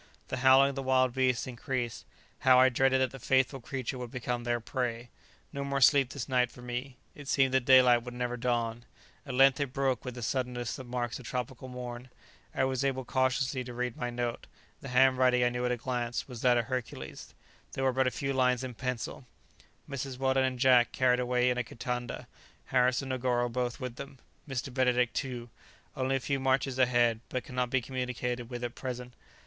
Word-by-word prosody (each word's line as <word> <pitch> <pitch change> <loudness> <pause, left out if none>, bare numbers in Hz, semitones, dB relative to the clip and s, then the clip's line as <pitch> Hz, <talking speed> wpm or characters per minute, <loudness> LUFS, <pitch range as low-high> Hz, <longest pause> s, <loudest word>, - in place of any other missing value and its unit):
The - - -2
howling 130 +2 +6
of 140 - -6
the 135 - -3
wild 130 -1 +2
beasts 130 -2 +1
increased. 125 -1 -4 0.3
How 130 -1 +6
I 130 0 +7
dreaded 130 +1 +2
that 130 -2 +1
the 135 - -9
faithful 130 0 +2
creature 130 0 -4
would 125 -1 -5
become 120 -1 -3
their 120 0 0
prey! 120 0 -3 0.4
No 140 -1 -3
more 140 0 -1
sleep 135 -1 +5
this 135 -3 -5
night 125 -2 +2
for 125 - -14
me. 125 +1 -5 0.2
It 145 -1 -11
seemed 135 -2 +2
that 130 -2 +2
daylight 125 -2 +7
would 120 0 -8
never 125 0 -2
dawn; 120 -1 -1 0.4
at 130 - -4
length 135 +1 +5
it 140 -3 -2
broke 135 -4 0
with 125 -1 -6
the 120 - -6
suddenness 125 -1 -2
that 130 - -8
marks 120 -1 -3
a - - -11
tropical 125 +1 -5
morn. 125 0 -7 0.5
I - - +2
was 130 0 0
able 130 -2 -1
cautiously 130 +1 0
to 125 -1 -8
read 125 -1 -2
my 125 - -3
note; 120 -1 -3 0.3
the - - -9
handwriting, 130 -1 +4
I 120 - +4
knew 125 0 -2
at - - 0
a 125 - 0
glance, 120 -1 -3
was 125 -4 -8
that 125 -1 +4
of 120 - +1
Hercules; 110 - -6 0.4
there 135 - -2
were 130 -1 +2
but 130 0 +2
a - - +4
few 135 +2 -3
lines 125 -1 +2
in 130 -1 -5
pencil: 125 +1 -4 0.6
"Mrs. 135 -2 -5
Weldon 130 0 +2
and 130 -1 -2
Jack 125 -2 +4
carried 125 -1 +3
away 125 0 +2
in 125 - -1
a - - 0
kitanda. 120 +1 -5 0.4
"Harris 125 +1 +2
and 135 - -6
Negoro 125 -1 0
both 125 +1 -2
with 125 -2 -6
them. 135 -1 -8 0.3
Mr. 130 0 -4
Benedict 125 -2 +2
too. 120 -4 -4 0.4
Only 130 +1 0
a - - +1
few 140 +2 -1
marches 130 0 +1
ahead, 120 -3 +3
but 130 - -3
cannot 125 -3 -2
be 130 0 +1
communicated 125 -1 -3
with 120 -1 -6
at 120 -1 -3
present. 125 -2 -6
125 Hz, 205 wpm, -30 LUFS, 120-130 Hz, 0.6 s, I